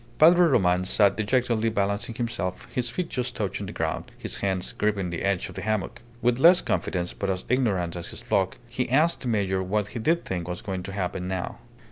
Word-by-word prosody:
Padre 175 +2 +7
Roman 90 - +3
sat 100 +2 +3
dejectedly 115 0 +1
balancing 100 +1 -1
himself, 95 -7 -3
his 125 -1 0
feet 175 +8 -2
just 125 -3 -3
touching 105 -5 -3
the - - -6
ground, - - -2
his - - -3
hands 95 -2 0
gripping 100 -4 -1
the 85 - -4
edge 100 -2 0
of - - -10
the 95 - -6
hammock. 110 +1 -2 0.2
With 120 +1 +2
less 175 +5 +7
confidence, 90 -1 -1
but 100 - -3
as 95 -1 -2
ignorant 100 -10 +1
as 85 - -5
his - - -7
flock, 95 -1 0
he 120 +1 -2
asked 155 +6 +3
the 130 - -4
major 100 -4 +1
what 105 +2 -1
did 115 -2 -5
he 165 - +6
think 90 - -5
was 90 0 -5
going 95 -2 -3
to 95 - -7
happen 90 -2 -3
now. 95 -1 -4
100 Hz, 210 wpm, -26 LUFS, 95-120 Hz, 0.2 s, Padre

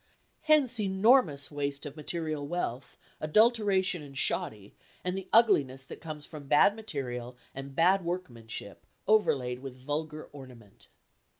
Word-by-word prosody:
Hence 290 -6 +3
enormous 190 - +3
waste 140 0 -3
of 145 -1 -7
material 155 -2 -3
wealth, 140 -7 -4 0.2
adulteration 200 0 +3
and 140 -2 -10
shoddy, 105 -5 -2 0.3
and 180 0 -2
the 190 -1 -6
ugliness 140 - +4
that - - -10
comes 155 -2 -7
from 150 -3 -10
bad 150 +8 +5
material 125 - -5 0.2
and 135 0 -8
bad 185 +4 +4
workmanship 120 - -6 0.2
overlaid 135 -13 +2
with 135 -1 -8
vulgar 150 +3 -4
ornament. 125 -7 -14
150 Hz, 125 wpm, -30 LUFS, 135-190 Hz, 0.3 s, bad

